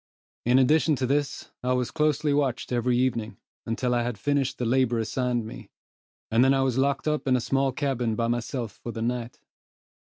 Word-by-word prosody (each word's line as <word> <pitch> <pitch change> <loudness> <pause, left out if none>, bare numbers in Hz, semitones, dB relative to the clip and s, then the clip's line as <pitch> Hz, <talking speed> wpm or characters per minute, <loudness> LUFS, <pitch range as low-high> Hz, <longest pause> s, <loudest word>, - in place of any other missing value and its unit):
In 125 +1 +5
addition 150 +4 +4
to 130 - -1
this, 140 +2 -1
I 125 0 0
was 125 -1 -1
closely 150 -1 +1
watched 135 -4 0
every 120 0 +1
evening, 120 -3 -1 0.3
until 125 +2 0
I 120 - +2
had 120 -2 -3
finished 140 +4 0
the 125 - -2
labor 120 0 +2
assigned 120 +1 -1
me, 110 - -9 0.6
and 115 +3 +4
then 135 +1 +4
I 135 - +2
was 130 -1 0
locked 140 +2 +1
up 150 -2 -1
in 130 - +4
a - - +2
small 135 +2 +1
cabin 125 -5 -1
by 115 - 0
myself 120 -1 -2
for 120 - -8
the 115 -1 -4
night. 120 0 -3
125 Hz, 195 wpm, -26 LUFS, 120-135 Hz, 0.6 s, In